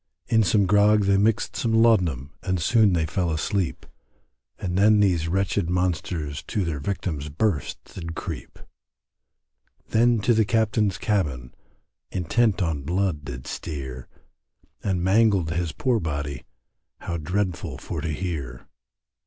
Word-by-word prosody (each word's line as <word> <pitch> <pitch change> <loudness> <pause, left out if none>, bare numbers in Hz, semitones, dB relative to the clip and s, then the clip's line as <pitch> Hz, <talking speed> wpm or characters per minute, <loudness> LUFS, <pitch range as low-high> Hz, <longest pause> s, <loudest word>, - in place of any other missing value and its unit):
In 115 -1 +3
some 100 0 +3
grog 105 +2 +4
they 100 0 +4
mixed 105 +2 +1
some 115 -2 0
laudanum 90 - +3
And 95 -2 -1
soon 105 +3 +4
they 80 -2 +1
fell 90 +3 -1
asleep. 85 +3 -1 0.7
And 90 -1 -3
then 105 +2 +5
these 90 -5 +2
wretched 95 0 0
monsters 85 -4 -1
To 105 -5 -1
their 80 -4 -2
victim's 75 -3 -3
berths 80 +2 -1
did 85 -2 -7
creep; - - -6 1.3
Then 120 +1 +3
to 120 - +3
the 110 0 +4
Captain's 105 -3 +1
cabin, 75 - -1 0.6
Intent 100 +3 +1
on 80 -4 -1
blood 85 0 -1
did 65 -3 -7
steer, 65 -5 -6 0.8
And 95 -3 0
mangled 95 -4 +3
his 85 0 -1
poor 125 - 0
body, 70 - -4 0.6
How 85 - -3
dreadful 90 +3 -2
for 80 - -5
to 80 - -3
hear. 75 -7 -4
90 Hz, 135 wpm, -24 LUFS, 80-105 Hz, 1.3 s, then